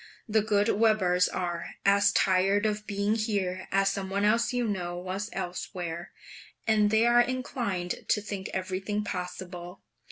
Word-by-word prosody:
The 220 Hz, 0 st, +3 dB
good 205 Hz, 0 st, +2 dB
Webers 195 Hz, -5 st, +3 dB
are 175 Hz, -2 st, -4 dB
as 200 Hz, 0 st, +5 dB
tired 195 Hz, +2 st, +3 dB
of 210 Hz, 0 st, -1 dB
being 200 Hz, +1 st, 0 dB
here 200 Hz, -5 st, -1 dB
as 195 Hz, 0 st, +3 dB
some 195 Hz, -1 st, -4 dB
one 200 Hz, +1 st, 0 dB
else 230 Hz, +3 st, +3 dB
you 245 Hz, -2 st, 0 dB
know 175 Hz, -4 st, -3 dB
was 185 Hz, +4 st, -4 dB
elsewhere; 175 Hz, -2 st, -5 dB, 0.5 s
and 215 Hz, -2 st, +3 dB
they 220 Hz, +2 st, +4 dB
are 240 Hz, 0 st, +6 dB
inclined 240 Hz, -8 st, -2 dB
to -, -, +3 dB
think 200 Hz, -2 st, -5 dB
everything 190 Hz, +2 st, -2 dB
possible. 180 Hz, -1 st, -6 dB
200 Hz, 150 wpm, -28 LUFS, 185-215 Hz, 0.5 s, are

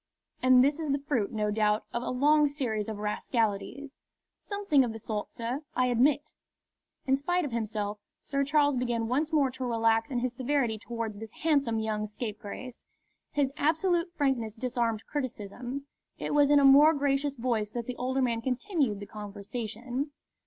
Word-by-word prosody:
"And 255 Hz, -1 st, +6 dB
this 285 Hz, +3 st, +2 dB
is 315 Hz, -2 st, -3 dB
the 280 Hz, -, +2 dB
fruit, 245 Hz, -9 st, 0 dB
no 210 Hz, -2 st, 0 dB
doubt, 210 Hz, 0 st, +1 dB
of 235 Hz, -, -1 dB
a -, -, -3 dB
long 295 Hz, +4 st, +4 dB
series 230 Hz, -7 st, -2 dB
of 215 Hz, -, -4 dB
rascalities." 225 Hz, +6 st, -2 dB, 0.4 s
"Something 400 Hz, -9 st, +2 dB
of 235 Hz, -3 st, -2 dB
the -, -, -6 dB
sort, 215 Hz, -1 st, -4 dB
sir, 240 Hz, +5 st, -3 dB
I 255 Hz, -, +3 dB
admit." 280 Hz, +5 st, +2 dB, 0.7 s
In 265 Hz, -, +4 dB
spite 350 Hz, +5 st, 0 dB
of 280 Hz, -, -4 dB
himself, 215 Hz, -2 st, -2 dB, 0.2 s
Sir 275 Hz, 0 st, 0 dB
Charles 290 Hz, 0 st, +3 dB
began 240 Hz, -2 st, -1 dB
once 295 Hz, +7 st, 0 dB
more 285 Hz, -4 st, +3 dB
to 260 Hz, +1 st, -6 dB
relax 225 Hz, -2 st, +2 dB
in 255 Hz, -, -2 dB
his 245 Hz, 0 st, -1 dB
severity 255 Hz, -4 st, 0 dB
towards 225 Hz, -1 st, -4 dB
this 220 Hz, -1 st, -8 dB
handsome 280 Hz, -8 st, +2 dB
young 215 Hz, -1 st, -1 dB
scapegrace. 220 Hz, +3 st, -7 dB, 0.5 s
His 280 Hz, -2 st, +1 dB
absolute 335 Hz, +3 st, +1 dB
frankness 250 Hz, -7 st, 0 dB
disarmed 235 Hz, -2 st, -1 dB
criticism. 250 Hz, 0 st, -5 dB, 0.3 s
It -, -, -3 dB
was 290 Hz, -1 st, +5 dB
in 290 Hz, -, +6 dB
a 280 Hz, -, +5 dB
more 290 Hz, +4 st, +8 dB
gracious 280 Hz, 0 st, 0 dB
voice 230 Hz, -4 st, -1 dB
that 235 Hz, +1 st, -4 dB
the 250 Hz, -, -4 dB
older 260 Hz, +1 st, 0 dB
man 230 Hz, -2 st, 0 dB
continued 260 Hz, -, -1 dB
the -, -, -5 dB
conversation. 220 Hz, +6 st, -5 dB
250 Hz, 170 wpm, -29 LUFS, 225-285 Hz, 0.7 s, more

